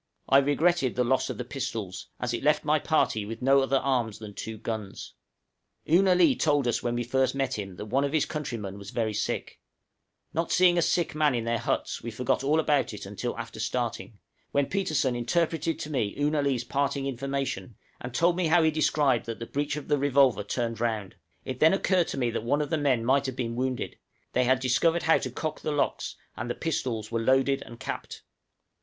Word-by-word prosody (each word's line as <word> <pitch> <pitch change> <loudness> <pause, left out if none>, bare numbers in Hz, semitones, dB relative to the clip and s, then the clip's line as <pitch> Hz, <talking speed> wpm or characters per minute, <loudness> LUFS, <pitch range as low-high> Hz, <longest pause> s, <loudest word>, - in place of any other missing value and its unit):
I 135 - +6
regretted 145 -1 +2
the 125 - +2
loss 130 +2 +1
of - - -4
the 125 - -4
pistols, 110 -8 -5
as - - -2
it - - -2
left - - +2
my - - +3
party 110 - +1
with 115 +4 -7
no 135 +1 +5
other 135 0 +2
arms 125 -5 0
than 105 -2 -9
two 110 +2 -6
guns. 110 -3 -6 0.7
Oo 170 +5 +5
na 190 -2 +4
lee 180 -2 +5
told 145 -4 +2
us 120 - 0
when 120 0 -1
we 120 - -1
first 130 +2 +1
met 130 -4 -1
him 95 -2 -6
that 105 - -7
one 130 +6 +1
of 140 - -1
his 155 -2 +2
countrymen 115 -10 -5
was 100 0 -9
very 110 -1 -1
sick; 105 - -3 0.7
not 165 +2 -1
seeing 180 -1 +5
a 170 - +3
sick 170 +1 +1
man 150 -3 +2
in 115 - -1
their 115 0 0
huts, - - -2
we 120 - -5
forgot 125 +3 -1
all 150 +3 +3
about 145 -7 +1
it 105 - -8
until 105 +5 -4
after 115 -1 -7
starting, 115 -1 -3 0.3
when 140 0 +2
Petersen 150 -8 0
interpreted 165 +5 0
to 155 - -6
me 115 -8 -1
Oo 145 +1 +2
na 155 - +1
lee's 135 -4 0
parting 140 +2 -1
information, 135 -2 -3 0.2
and 125 - -6
told 170 +7 +2
me 180 -2 +1
how 165 +1 +4
he 160 - +4
described 150 -5 +2
that 115 - -4
the 115 - -6
breech 145 +3 -2
of 150 - -6
the 145 -1 +2
revolver 135 -6 +3
turned 115 +2 -2
round; 110 -5 -2 0.3
it 130 -1 -5
then 160 +4 +6
occurred 185 -3 +2
to - - -4
me 120 -3 0
that 115 - -2
one 145 +5 +1
of 145 - -7
the - - +3
men 130 -6 +1
might 135 +2 +3
have 130 - -4
been 115 -2 -3
wounded, 130 0 -3 0.3
they 125 - +2
had 130 +1 +3
discovered 160 +7 +2
how 165 - +4
to - - -4
cock 155 -1 -4
the 155 - -2
locks, 145 - -1 0.2
and 120 +2 -5
the 120 - -2
pistols 115 -9 -2
were 115 -1 0
loaded 135 +3 +2
and 115 - -11
capped. - - -6
130 Hz, 220 wpm, -27 LUFS, 115-150 Hz, 0.7 s, I